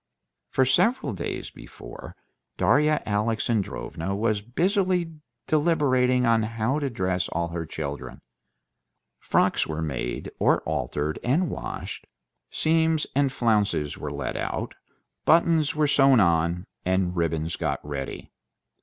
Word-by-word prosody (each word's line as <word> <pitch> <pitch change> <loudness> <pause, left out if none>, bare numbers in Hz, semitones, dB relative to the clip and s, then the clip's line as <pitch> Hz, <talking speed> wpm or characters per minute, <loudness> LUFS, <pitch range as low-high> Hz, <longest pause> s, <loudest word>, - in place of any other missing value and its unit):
For 130 - +2
several 225 - +2
days 85 -3 -5
before, - - -11 0.4
Darya 150 +2 +3
Alexandrovna 105 -4 -1
was 105 0 0
busily 180 - 0 0.3
deliberating 135 -6 +2
on 115 -1 +4
how 115 +5 -1
to 140 -2 -1
dress 95 -5 -1
all 85 0 -1
the 85 -1 -4
children. 70 -2 -6 1.0
Frocks - - +2
were 80 0 -3
made 65 -5 -4
or - - +3
altered 75 +1 -2
and 155 +8 +1
washed, - - -6 0.4
seams 160 -1 +2
and 140 -1 +3
flounces 105 - +1
were - - -5
let - - -4
out, - - -3 0.5
buttons 165 -2 +3
were 150 0 +2
sewn 135 -3 +5
on, 85 -1 +2 0.2
and 95 -1 0
ribbons 80 -1 -1
got - - -2
ready. 70 -2 -5
115 Hz, 120 wpm, -25 LUFS, -, 1.0 s, sewn